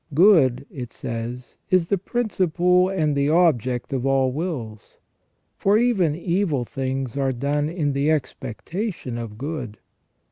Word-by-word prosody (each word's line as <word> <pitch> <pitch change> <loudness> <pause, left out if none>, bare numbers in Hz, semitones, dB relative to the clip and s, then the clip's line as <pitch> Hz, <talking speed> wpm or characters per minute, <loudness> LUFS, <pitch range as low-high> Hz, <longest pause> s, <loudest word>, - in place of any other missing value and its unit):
"Good," 145 - +5
it 125 -4 -7
says, 120 +2 -6
" - - -46
is 185 -2 +3
the 200 +4 +1
principle 180 -5 +1
and 155 -6 0
the 140 +1 +2
object 135 -7 +2
of 130 -2 -1
all 135 -1 +2
wills; 130 - -5 0.6
for 200 +2 +4
even 205 -10 +2
evil 170 -6 0
things 130 -1 -3
are 135 -1 +1
done 145 +4 -1
in 155 -4 -1
the 140 +2 +1
expectation 150 - -3
of 110 -3 -7
good. 130 -5 -5
145 Hz, 140 wpm, -23 LUFS, 125-180 Hz, 0.6 s, Good